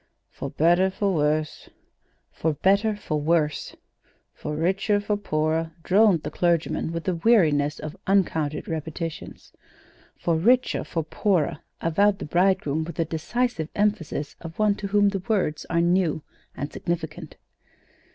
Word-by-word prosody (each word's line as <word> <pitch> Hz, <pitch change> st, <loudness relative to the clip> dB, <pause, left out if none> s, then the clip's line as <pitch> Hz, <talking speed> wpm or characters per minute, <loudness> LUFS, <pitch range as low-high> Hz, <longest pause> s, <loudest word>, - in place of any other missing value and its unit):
"For -, -, -6 dB
better 175 Hz, +4 st, +3 dB
for 195 Hz, +1 st, -1 dB
worse." 155 Hz, -1 st, -1 dB, 0.6 s
"'For 160 Hz, -1 st, -1 dB
better 200 Hz, +8 st, +2 dB
for 155 Hz, -7 st, -3 dB
worse.'" 155 Hz, -1 st, 0 dB, 0.6 s
"For 150 Hz, -, -5 dB
richer 195 Hz, +6 st, +1 dB
for 205 Hz, +1 st, -1 dB
poorer," 160 Hz, -4 st, -1 dB
droned 195 Hz, -3 st, +4 dB
the -, -, -4 dB
clergyman, 170 Hz, -2 st, 0 dB
with 165 Hz, 0 st, -4 dB
the 185 Hz, -, 0 dB
weariness 155 Hz, -8 st, +3 dB
of 155 Hz, 0 st, -7 dB
uncounted 160 Hz, -6 st, +1 dB
repetitions. 160 Hz, 0 st, -6 dB, 0.6 s
"'For 170 Hz, -, 0 dB
richer 245 Hz, +9 st, +3 dB
for 165 Hz, -, -3 dB
poorer,'" 160 Hz, -2 st, 0 dB, 0.2 s
avowed 195 Hz, +5 st, +2 dB
the -, -, -6 dB
bridegroom, 165 Hz, -3 st, +1 dB
with 170 Hz, +2 st, -7 dB
the 165 Hz, -, 0 dB
decisive 165 Hz, +2 st, -2 dB
emphasis 200 Hz, -8 st, -1 dB
of 165 Hz, -1 st, -9 dB
one 215 Hz, -1 st, +3 dB
to 200 Hz, -, -4 dB
whom 205 Hz, 0 st, +3 dB
the 195 Hz, -2 st, -3 dB
words 185 Hz, -9 st, 0 dB
are 170 Hz, 0 st, +2 dB
new 170 Hz, -3 st, +1 dB, 0.3 s
and 145 Hz, +3 st, -5 dB
significant. 170 Hz, -2 st, -4 dB
170 Hz, 140 wpm, -25 LUFS, 155-200 Hz, 0.6 s, droned